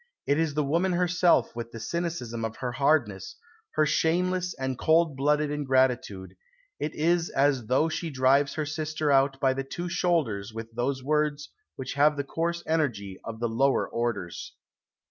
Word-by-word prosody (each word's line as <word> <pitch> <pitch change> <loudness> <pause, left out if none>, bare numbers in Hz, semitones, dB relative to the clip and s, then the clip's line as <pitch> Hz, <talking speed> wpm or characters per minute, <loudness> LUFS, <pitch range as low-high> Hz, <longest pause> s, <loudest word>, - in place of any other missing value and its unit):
It 145 +2 +2
is 160 -3 0
the 150 - +1
woman 170 +6 +1
herself 180 -5 +2
with 115 -1 -5
the 115 - -8
cynicism 125 -5 -3
of 110 0 -3
her 125 -1 -4
hardness, 120 -8 0 0.4
her 155 - +4
shameless 180 +4 +1
and 130 0 -3
cold 160 +2 +2
blooded 150 +2 +1
ingratitude.... 130 -9 0 0.5
It 155 - -3
is 170 +2 +1
as 135 -4 +1
though 130 +6 +3
she 165 +1 -3
drives 140 +1 +2
her 155 - -1
sister 155 0 -2
out 135 0 +3
by 135 -2 +3
the 135 +1 -3
two 175 +6 -5
shoulders 120 - 0
with 115 0 -7
those 130 +3 -2
words 150 0 0 0.2
which 130 -1 -5
have 145 +1 +3
the 140 - -1
coarse 170 +4 -2
energy 120 -12 -1
of 110 -1 -7
the 120 - 0
lower 135 +4 +1
orders." 115 -7 -4
140 Hz, 165 wpm, -27 LUFS, 120-160 Hz, 0.5 s, her